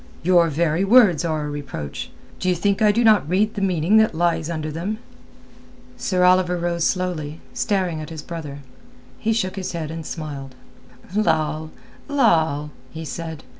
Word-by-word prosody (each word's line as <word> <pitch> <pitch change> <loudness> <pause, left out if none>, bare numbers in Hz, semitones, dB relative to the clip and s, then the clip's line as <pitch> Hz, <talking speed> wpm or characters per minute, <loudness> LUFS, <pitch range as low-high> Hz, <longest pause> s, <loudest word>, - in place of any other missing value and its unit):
"Your 175 -1 +5
very 165 +3 +1
words 195 - +5
are 155 -3 -1
a - - -3
reproach. 140 - -6 0.3
D'ye 185 -1 +1
think 200 +4 0
I 210 -1 +6
do 230 +3 +1
not 215 -8 +4
read 210 +4 +2
the 205 - -4
meaning 185 +1 +3
that 220 -6 +4
lies 165 -1 +1
under 155 -2 -3
them?" 180 +8 -3 1.0
Sir 180 -2 0
Oliver 180 -1 +4
rose 170 -1 -1
slowly, 165 -5 -2
staring 185 -7 -1
at 155 - -7
his 160 -2 -7
brother. 150 -4 -7 0.6
He 220 - 0
shook 195 -4 -1
his 185 -1 -4
head 160 -2 -4
and 165 0 -6
smiled. 145 -5 -6 0.6
"Lal, 160 -5 +1 0.4
Lal!" 160 - +2 0.2
he 160 +4 -7
said. 160 -1 -6
170 Hz, 160 wpm, -22 LUFS, 155-190 Hz, 1.0 s, I